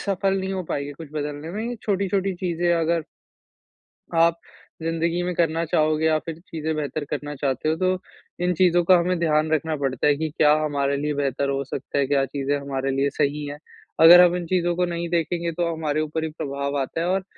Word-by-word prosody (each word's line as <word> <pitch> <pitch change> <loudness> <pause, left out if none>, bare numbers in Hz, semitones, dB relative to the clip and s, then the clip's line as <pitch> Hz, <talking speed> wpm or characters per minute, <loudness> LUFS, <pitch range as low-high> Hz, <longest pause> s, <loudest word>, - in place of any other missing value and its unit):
सफल 195 0 +1
नहीं 190 +1 -3
हो 185 -1 -2
पाएँगे 145 -1 -3
कुछ 155 +1 -10
बदलने 150 +1 -4
में 230 +4 -3
छोटी-छोटी 195 -1 0
चीज़ें 175 -1 0
अगर 165 0 +1 1.1
आप 165 0 +4 0.4
ज़िन्दगी 165 +1 -1
में 180 0 -2
करना 165 -1 +1
चाहोगे 155 0 +1
या 155 -1 +3
फिर 165 0 -7
चीज़ें 160 -3 -4
बेहतर 150 0 -3
करना 145 0 -4
चाहते 135 +2 -1
हो 160 - +1
तो 185 +2 +1 0.5
इन 180 0 +2
चीज़ों 175 0 +3
का 180 +1 +6
हमें 180 +1 0
ध्यान 155 -1 +1
रखना 155 0 0
पड़ता 135 0 0
है 145 - +4
कि 160 0 -2
क्या 150 -1 +5
हमारे 140 -2 0
लिए 150 +1 -1
बेहतर 140 -1 -1
हो 140 0 -1
सकता 140 +1 -5
है, 140 - +3
क्या 140 -1 +2
चीज़ें 140 +1 -2
हमारे 135 -1 -2
लिए 135 +1 +1
सही 145 +1 -1
है। 145 0 -6 0.4
अगर 175 +2 +10
हम 180 0 +5
इन 175 -1 -3
चीज़ों 175 -1 +1
को 180 +1 +1
नहीं 170 0 -3
देखेंगे 170 0 -1
तो 170 +1 -1
हमारे 155 -1 -1
ऊपर 155 +1 -3
ही 160 - -2
प्रभाव 140 -1 -3
आता 135 +5 -4
है 175 - 0
और 190 +1 0
160 Hz, 205 wpm, -23 LUFS, 145-175 Hz, 1.1 s, अगर